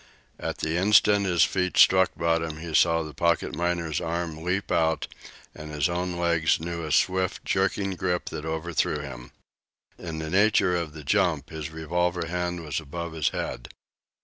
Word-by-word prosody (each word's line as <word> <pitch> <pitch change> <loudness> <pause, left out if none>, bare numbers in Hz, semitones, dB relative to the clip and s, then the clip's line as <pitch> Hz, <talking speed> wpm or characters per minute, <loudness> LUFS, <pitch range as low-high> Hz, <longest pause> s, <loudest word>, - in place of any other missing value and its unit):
At - - -4
the 80 +2 -1
instant 100 +1 +4
his 85 -2 +4
feet 90 -1 0
struck 95 0 +6
bottom 80 -1 0
he 80 0 -7
saw 80 0 +4
the 75 -1 -8
pocket 85 +3 0
miner's 85 -2 -1
arm 85 -1 -3
leap 90 +3 -2
out, 80 -1 +1 0.5
and 75 0 -9
his 75 +3 +1
own 90 0 -2
legs 85 -2 +2
knew 85 +1 -4
a 75 - -4
swift, 95 +3 +1
jerking 100 0 0
grip 90 -1 -2
that 75 - -6
overthrew 80 0 -1
him. - - -9 0.7
In 80 -3 -6
the 80 0 -5
nature 100 -2 +3
of 85 -3 -3
the 75 -1 -9
jump 70 - +1
his 80 -1 -5
revolver 85 +2 -1
hand 90 0 -3
was 75 - -2
above 85 +2 -6
his 80 -2 +1
head. - - -5
85 Hz, 170 wpm, -26 LUFS, 80-90 Hz, 0.7 s, struck